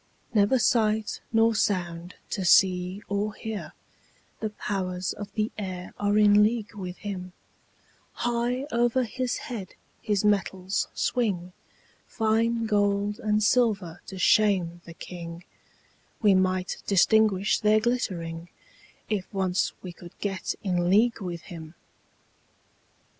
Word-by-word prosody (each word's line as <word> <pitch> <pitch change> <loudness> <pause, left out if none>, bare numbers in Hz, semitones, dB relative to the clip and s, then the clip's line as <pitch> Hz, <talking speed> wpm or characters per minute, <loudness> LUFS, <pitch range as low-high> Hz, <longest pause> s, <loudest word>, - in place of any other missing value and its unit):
Never 210 +4 +4
sight 220 -3 +1
nor 225 0 +4
sound 175 -4 -1 0.2
to 195 - -2
see 185 +1 +3
or 205 +1 -2
hear; 220 -2 -6 0.7
The 215 - -2
powers 185 -3 -3
of 205 0 -8
the 215 0 -1
air 185 -3 -6
are 205 0 +2
in 210 -1 +6
league 215 0 +1
with 185 -3 -6
him; 185 -3 -6 0.8
High 240 +2 -1
over 240 +2 +2
his 250 +2 -2
head 225 -10 -7 0.3
his 210 -1 0
metals 190 -2 0
swing, 190 -8 -1 0.5
Fine 230 +1 +1
gold 205 0 +1
and 215 -2 +1
silver 205 -8 +1
to 190 - -8
shame 180 -3 +3
the 170 - -11
king; 170 0 -8 0.8
We 210 -3 +5
might 185 -1 +1
distinguish 205 0 +3
their 215 0 +4
glittering, 175 -8 -2 0.6
If 200 -4 -3
once 190 -2 0
we 180 -2 -7
could 175 0 -14
get 195 -3 -2
in 175 -3 +1
league 225 +4 +3
with 175 -3 -5
him. 160 -1 -10
205 Hz, 120 wpm, -26 LUFS, 180-220 Hz, 0.8 s, in